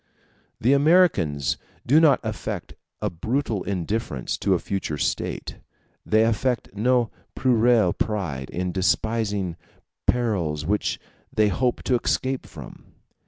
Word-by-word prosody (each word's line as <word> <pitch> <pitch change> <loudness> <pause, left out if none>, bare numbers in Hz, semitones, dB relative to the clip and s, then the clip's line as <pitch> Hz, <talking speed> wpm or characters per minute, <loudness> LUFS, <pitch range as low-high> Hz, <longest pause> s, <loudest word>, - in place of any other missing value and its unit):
The 125 +5 +3
Americans 140 - +3 0.3
do 145 +6 +5
not 155 -4 +5
affect 110 -4 -4 0.3
a - - 0
brutal 110 - -1
indifference 95 - -2
to - - +2
a - - +2
future 95 -6 -3
state; - - -2 0.4
they 110 +1 +3
affect 115 0 0
no 120 +2 +2 0.2
puerile 120 -6 +3
pride 85 -12 -2
in 90 +1 -2
despising 100 -1 0 0.5
perils 90 -12 0
which 105 +4 0 0.3
they 105 -1 +3
hope 125 +4 0
to 130 - +2
escape 130 0 -1
from. - - -11
110 Hz, 120 wpm, -24 LUFS, 90-125 Hz, 0.5 s, do